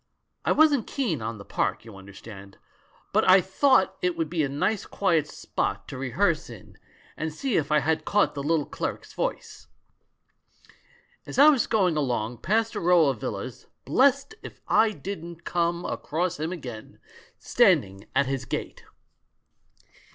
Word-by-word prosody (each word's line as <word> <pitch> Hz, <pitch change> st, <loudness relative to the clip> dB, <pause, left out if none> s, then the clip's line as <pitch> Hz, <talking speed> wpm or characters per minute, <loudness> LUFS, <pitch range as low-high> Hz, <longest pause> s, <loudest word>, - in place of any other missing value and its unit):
I -, -, +1 dB
wasn't 295 Hz, -6 st, +4 dB
keen 210 Hz, -, -2 dB
on 110 Hz, 0 st, -4 dB
the 100 Hz, -, -11 dB
park, -, -, -2 dB
you 110 Hz, -3 st, -11 dB
understand, 100 Hz, 0 st, -12 dB, 0.6 s
but -, -, +3 dB
I 185 Hz, +1 st, +8 dB
thought 190 Hz, 0 st, +2 dB
it 180 Hz, -1 st, 0 dB
would 165 Hz, -2 st, -2 dB
be 170 Hz, -2 st, 0 dB
a 140 Hz, -, 0 dB
nice 185 Hz, +9 st, -1 dB
quiet 165 Hz, -6 st, +1 dB
spot 100 Hz, -8 st, -4 dB
to 135 Hz, -, -7 dB
rehearse 150 Hz, +6 st, 0 dB
in 115 Hz, -6 st, -13 dB, 0.4 s
and 160 Hz, 0 st, -3 dB
see 240 Hz, -, -2 dB
if 150 Hz, -2 st, 0 dB
I 150 Hz, 0 st, +4 dB
had 160 Hz, +3 st, 0 dB
caught 205 Hz, 0 st, +2 dB
the 140 Hz, -, -5 dB
little 150 Hz, 0 st, +1 dB
cleric's -, -, -5 dB
voice. -, -, -4 dB, 1.6 s
As -, -, -7 dB
I 290 Hz, +3 st, +8 dB
was 280 Hz, -5 st, +2 dB
going 185 Hz, -8 st, +2 dB
along, 120 Hz, -5 st, -2 dB
past 220 Hz, -, 0 dB
a -, -, -3 dB
row 170 Hz, -4 st, +4 dB
of 130 Hz, -5 st, -4 dB
villas, -, -, -6 dB, 0.2 s
blest 275 Hz, -, +2 dB
if -, -, -11 dB
I 225 Hz, -, +4 dB
didn't 170 Hz, -2 st, -7 dB
come 170 Hz, 0 st, -1 dB
across 175 Hz, +2 st, -2 dB
him 160 Hz, +2 st, -2 dB
again, 125 Hz, -11 st, -8 dB, 0.4 s
standing 95 Hz, +1 st, +2 dB
at 140 Hz, +1 st, +3 dB
his 135 Hz, -1 st, -3 dB
gate -, -, -5 dB
160 Hz, 160 wpm, -26 LUFS, 130-195 Hz, 1.6 s, I